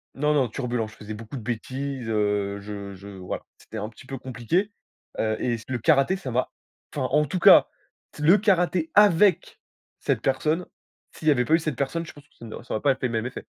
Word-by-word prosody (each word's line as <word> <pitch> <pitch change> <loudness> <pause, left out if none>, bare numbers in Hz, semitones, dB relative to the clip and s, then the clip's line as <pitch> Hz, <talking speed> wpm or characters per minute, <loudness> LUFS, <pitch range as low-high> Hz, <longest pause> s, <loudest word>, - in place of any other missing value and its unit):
non, 150 +2 +1
non, 135 -4 +3
turbulent. 120 -2 -2
Je 110 - -14
faisais 105 0 -8
beaucoup 115 +5 -8
de - - -6
bêtises, 130 +2 -4
heu, 105 -2 0
je 100 -1 -7
je 100 +2 -12
voilà. 95 -2 -6
C'était - - -10
un 105 +1 -4
petit 115 +4 -16
peu 135 0 -6
compliqué, 130 - -1 0.5
heu, 110 0 0
et 120 -2 0
c 115 - -13
le 130 - -1
karaté, 140 - +3
ça 150 -10 -6
m'a 125 +2 0 0.5
enfin, 130 -3 0
en 150 +2 +3
tout 165 +6 -3
cas, - - +8 0.5
le 170 +7 +6
karaté 180 -5 +2
avec 200 -3 +4 0.4
cette - - 0
personne, 155 +6 0 0.5
s'il 155 - -7
y - - +7
avait 125 -3 +2
pas 160 - +1
eu 165 - +6
cette 155 -4 -3
personne, 140 +7 -2
je - - -11
pense 145 - -15
que - - -33
ça 115 - -12
n'au 110 - -8
ça - - -6
aurait 110 - -1
pas 140 - +4
été 130 0 -5
le 115 - -6
même 110 0 -1
effet. - - -8
130 Hz, 230 wpm, -25 LUFS, 110-155 Hz, 0.5 s, cas